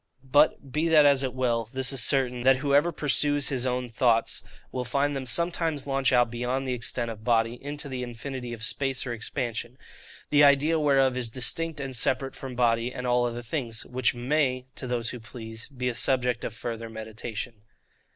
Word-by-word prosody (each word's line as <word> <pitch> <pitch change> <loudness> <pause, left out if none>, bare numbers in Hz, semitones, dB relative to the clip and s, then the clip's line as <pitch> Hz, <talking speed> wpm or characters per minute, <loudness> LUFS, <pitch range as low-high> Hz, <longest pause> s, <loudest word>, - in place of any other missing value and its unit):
But, 145 -2 +3
be 155 +5 +1
that 155 -2 +6
as 140 -2 +5
it 130 -2 -1
will, 120 -3 0
this 130 0 -1
is 135 - 0
certain, 125 -1 +2
that 130 +2 +5
whoever 145 +4 +2
pursues 145 -1 +2
his 130 -2 0
own 125 0 -1
thoughts, 115 -1 +2 0.3
will 125 - -2
find 140 +4 0
them 135 -1 -4
sometimes 165 +1 -1
launch 135 -1 +1
out 120 -2 +3
beyond 125 +3 -2
the 130 - 0
extent 120 -1 -1
of 110 -1 -10
body, 115 +1 +1
into 145 +1 -5
the 130 -2 -4
infinity 125 +1 -6
of 115 -2 -6
space 135 +3 0
or 120 - -3
expansion; 120 +1 -4 0.5
the 145 0 +6
idea 145 +3 +5
whereof 135 -3 +3
is 125 -2 -1
distinct 140 +7 -1
and 135 -2 -2
separate 130 +3 0
from 130 -2 -7
body 120 0 +2
and 125 0 -6
all 125 0 +2
other 120 0 -4
things: 115 -3 -3
which 125 0 0
may, 130 0 0
(to 130 - -6
those 120 -2 -1
who 125 - -7
please,) 110 -1 -9
be 125 -3 -4
a 125 - 0
subject 125 0 0
of 110 - -4
further 115 0 -5
meditation. 110 0 -6
125 Hz, 190 wpm, -27 LUFS, 120-140 Hz, 0.5 s, that